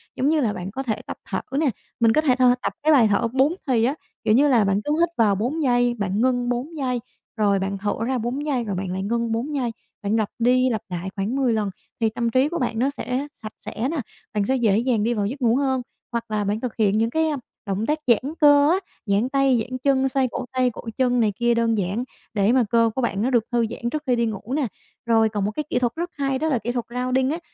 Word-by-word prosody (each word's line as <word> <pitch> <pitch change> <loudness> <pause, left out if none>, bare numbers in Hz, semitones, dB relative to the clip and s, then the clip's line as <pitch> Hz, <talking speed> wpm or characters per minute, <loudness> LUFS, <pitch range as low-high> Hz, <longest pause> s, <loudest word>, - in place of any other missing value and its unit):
giống 270 - +1
như 315 0 +3
là 220 -5 +1
bạn 185 +1 -6
có 265 +6 -4
thể 225 -5 -2
tập - - -6
thở - - -1 0.2
nè, 310 -3 +3 0.3
mình 230 -1 +4
có 310 - +4
thể 270 -5 +3
th 260 - -4 0.2
tập - - -2
cái 310 0 +5
bài 240 -6 +6
thở 210 +3 +2
4 265 +6 +2
thì 240 -4 +3
á, 265 +5 +1 0.3
kiểu 215 - +3
như 280 +6 +5
là, 245 -6 +4
bạn 195 +1 +1
cứ 295 - 0
hít 340 0 +3
vào 215 -4 +4
4 250 +11 -1
giây, 245 -2 +3
bạn 200 +1 0
ngưng 245 -1 +1
4 260 +7 -3
giây 255 -3 -1 0.4
rồi 200 -2 +3
bạn 195 +1 -2
thở 205 +1 -1
ra 255 +2 0
4 245 +5 -3
giây 270 -5 0
rồi 205 -4 -3
bạn 185 0 -3
lại 190 +1 -3
ngưng 235 +2 -1
4 255 +7 -2
giây, 250 -4 -1 0.3
bạn 205 +1 0
lặp 220 -2 +1
đi 255 +2 +3
lặp 220 -3 -1
lại 180 +1 -4
khoảng 205 +5 -2
10 260 -4 +2
lần 215 -2 0 0.3
thì 225 -1 +2
tâm 235 +1 -1
trí 255 +4 +3
của 340 - -3
bạn 235 -3 -1
nó 260 +3 +2
sẽ 275 0 -3
sạch 215 -1 -9
sẽ 240 +4 -4
nè, 330 - -2 0.4
bạn 210 -1 +1
sẽ 265 - +1
dễ 220 -6 +3
dàng 235 -2 +1
đi 235 +2 +1
vào 205 -3 -1
giấc 265 +7 -4
ngủ 235 -1 +3
hơn. 265 -1 +1 0.3
Hoặc 235 -1 -2
là 210 -1 0
bạn 205 +2 -1
thực 245 -1 -4
hiện 210 -2 +2
những 225 +1 +2
cái, 320 +5 +1
a, 300 -2 -1 0.3
động 200 +1 -1
tác 305 +4 0
giãn 255 +5 +2
cơ 290 0 +6
á, 370 - +3 0.3
giãn 205 +4 +1
tay, 275 -2 +3
giãn 255 +3 -5
chân, 270 -1 +3
xoay 265 0 +1
cổ 255 - -4
tay, 255 -1 +2
cổ 240 - -9 0.2
chân 250 -1 +2
này 215 -3 +2
kia 240 +2 +2
đơn 230 -1 +1
giản 200 +5 -1 0.3
để 205 0 +3
mà 255 0 +4
cơ 230 0 +4
của 265 - 0
bạn 205 -5 -1
nó 240 - +1
được 240 -4 +3
thư 240 -1 +2
giãn 235 +1 -4
trước 305 +4 -3
khi 250 - +3
đi 235 0 +1
ngủ 220 +2 -4
nè. 290 -4 +1 0.4
Rồi 225 -1 +4
còn 205 -2 -2
một 210 - -1
cái 300 - -3
kỹ 245 - +1
thuật 240 -2 0
rất 345 +2 -3
hay 275 -2 0
đó 315 - 0
là 260 -6 +1
kỹ 240 - -3
thuật 240 -1 -2
grounding 255 +2 0
á, 325 - -2
240 Hz, 275 wpm, -23 LUFS, 220-265 Hz, 0.4 s, bài